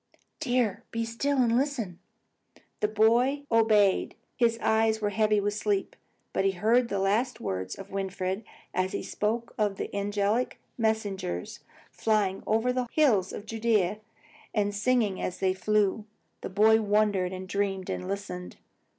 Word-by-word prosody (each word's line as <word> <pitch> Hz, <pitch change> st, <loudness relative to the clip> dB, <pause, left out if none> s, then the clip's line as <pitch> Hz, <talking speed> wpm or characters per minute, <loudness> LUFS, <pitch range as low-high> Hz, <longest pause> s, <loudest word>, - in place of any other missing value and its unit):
"Dear, 245 Hz, -, 0 dB
be 230 Hz, 0 st, -2 dB
still, 275 Hz, +5 st, -1 dB
and 235 Hz, -3 st, +3 dB
listen!" 245 Hz, -, -1 dB, 0.8 s
The 210 Hz, -, +2 dB
boy 235 Hz, +7 st, +3 dB
obeyed. 215 Hz, -4 st, +3 dB, 0.2 s
His 230 Hz, -1 st, +2 dB
eyes 220 Hz, -1 st, +2 dB
were 205 Hz, -1 st, -1 dB
heavy 215 Hz, 0 st, +2 dB
with 205 Hz, 0 st, 0 dB
sleep. 205 Hz, -2 st, -1 dB, 0.4 s
But -, -, +1 dB
he 195 Hz, 0 st, +2 dB
heard 230 Hz, +6 st, +2 dB
the 200 Hz, -, -1 dB
last 205 Hz, +6 st, +1 dB
words 95 Hz, 0 st, -3 dB
of 195 Hz, 0 st, -10 dB
Winfried 190 Hz, +1 st, -3 dB, 0.3 s
as 185 Hz, 0 st, 0 dB
he -, -, -2 dB
spoke 230 Hz, +3 st, -2 dB
of 205 Hz, -2 st, +1 dB
the -, -, -5 dB
angelic 205 Hz, +4 st, 0 dB, 0.2 s
messengers, 205 Hz, -, -2 dB, 0.3 s
flying 205 Hz, -3 st, 0 dB
over 225 Hz, +3 st, +2 dB
the 250 Hz, -1 st, -1 dB
hills 220 Hz, -, +3 dB
of 205 Hz, -, -7 dB
Judea 215 Hz, -3 st, +1 dB, 0.6 s
and 205 Hz, -1 st, +1 dB
singing 210 Hz, -2 st, +1 dB
as 180 Hz, -, -3 dB
they 190 Hz, -1 st, +1 dB
flew. 210 Hz, +2 st, +1 dB, 0.4 s
The -, -, -5 dB
child 215 Hz, +3 st, +5 dB
wondered 205 Hz, -3 st, +2 dB
and 185 Hz, 0 st, -6 dB
dreamed 195 Hz, -1 st, -1 dB
and 180 Hz, -, -4 dB
listened. 195 Hz, -2 st, -5 dB
210 Hz, 150 wpm, -28 LUFS, 195-230 Hz, 0.8 s, child